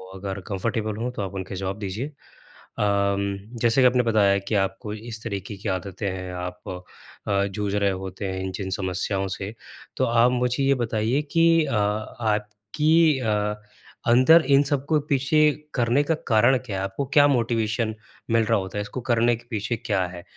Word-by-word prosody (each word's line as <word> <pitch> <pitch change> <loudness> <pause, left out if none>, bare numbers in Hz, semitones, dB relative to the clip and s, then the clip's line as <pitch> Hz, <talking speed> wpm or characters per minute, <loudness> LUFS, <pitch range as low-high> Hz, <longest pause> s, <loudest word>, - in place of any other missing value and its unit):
अगर 95 0 -5
कंफ़र्टेबल 110 +2 -2
हो 125 - -1
तो 125 - -5
आप 100 0 -5
उनके 95 0 -5
जवाब 95 +2 -4
दीजिए, 105 +7 -4 0.7
अम, 100 -1 +1 0.2
जैसे 120 +2 +3
कि 125 - +7
आपने 125 0 +3
बताया 105 -4 +3
कि 110 - 0
आपको 105 +2 -7
इस 110 +1 -8
तरीके 105 -1 -5
की 100 - -4
आदतें 95 +2 -3
हैं 95 -1 -5
आप 90 0 -6 0.7
अ, 100 0 +2
जूझ 100 0 -3
रहे 100 -1 +2
होते 95 +1 -5
हैं 95 - -4
इन 95 - -3
जिन 95 -2 -4
समस्याओं 95 +1 -1
से, 95 +3 -5 0.4
तो - - +2
आप 120 +1 +4
मुझे 125 +2 0
ये 140 0 +4
बताइए 115 +5 0
कि 165 -1 +5
अ, 140 - -3
आपकी 110 +8 +1
अ, 105 -3 0 0.5
अंदर 130 +8 +7
इन 140 - +5
सबको 145 +2 +1
पीछे 140 +2 +2 0.4
करने 125 +2 +2
का 160 +2 +1
कारण 120 +3 +4
क्या 100 -5 -4
हैं? 95 - -2
आपको 100 +8 -3
क्या 145 -2 +7
मोटिवेशन 115 -3 0 0.4
मिल 115 -1 +4
रहा - - +2
होता 95 +1 -6
हैं 105 - -1
इसको 115 +5 -6
करने 120 +1 +3
के 120 - -18
पीछे 110 +2 -2
क्या 100 -6 -1
हैं? 90 -1 -10
110 Hz, 180 wpm, -24 LUFS, 100-125 Hz, 0.7 s, कि